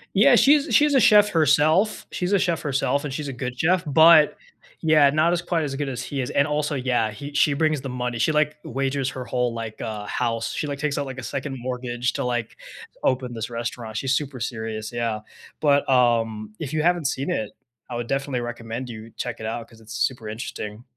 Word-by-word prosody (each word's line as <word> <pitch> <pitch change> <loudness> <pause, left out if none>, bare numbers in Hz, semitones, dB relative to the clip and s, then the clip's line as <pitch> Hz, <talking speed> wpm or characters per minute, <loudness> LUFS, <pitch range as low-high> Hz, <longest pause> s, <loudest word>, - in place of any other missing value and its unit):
Yeah, - - +6
she's 290 +2 +4
she's 295 -1 +5
a 265 - +5
chef 210 -1 +6
herself, 160 +6 +3
she's 180 +2 -2
a 200 - +4
chef 170 -3 0
herself 140 0 0
and 135 - -4
she's 145 -1 -4
a - - -5
good 125 0 -5
chef, 180 +4 +2
but, 160 +1 +6 0.5
yeah, 155 -3 +5
not 155 +4 +2
as 175 -1 0
quite 170 -2 -1
as 140 -2 -3
good 145 0 -2
as 125 -2 -4
he 140 - -5
is, 125 - -2
and 140 - +3
also 150 0 -1
yeah, 125 -4 0
he 140 +7 -8
she 145 0 +3
brings 155 0 +1
the 135 - -5
money, 125 -1 -3
she, 155 - +2
like, 150 0 +1
wagers 135 0 -1
her 130 - -6
whole, 125 -1 -1
like, 115 -1 -6
uh, 110 -2 -5
house, 115 -2 -1
she, 150 - -3
like, 140 -1 -4
takes 150 -1 -1
out, 140 - -1
like, 130 -1 -7
a 130 - -6
second 135 0 -4
mortgage 125 0 -2
to, - - -2
like, 120 -2 -3 0.5
open 125 -2 0
this 115 +1 -4
restaurant, 115 -1 -5
she's 130 +4 0
super 135 -2 -2
serious, 110 -2 -4
yeah, 115 -2 -2 0.4
but, 145 -2 +3
um, 115 -4 +2
if 150 0 -5
you 155 0 0
haven't 175 -3 +2
seen 135 0 -2
it, 110 -2 -2 0.4
I 120 - -5
would 120 0 -4
definitely 135 -2 -1
recommend 120 +1 -5
you 110 0 -9
check 120 -2 -4
it 110 - -6
out 115 +1 -4
'cause 115 -1 -18
it's 110 0 -11
super 115 -1 -1
interesting. 110 0 -6
130 Hz, 220 wpm, -24 LUFS, 120-150 Hz, 0.5 s, Yeah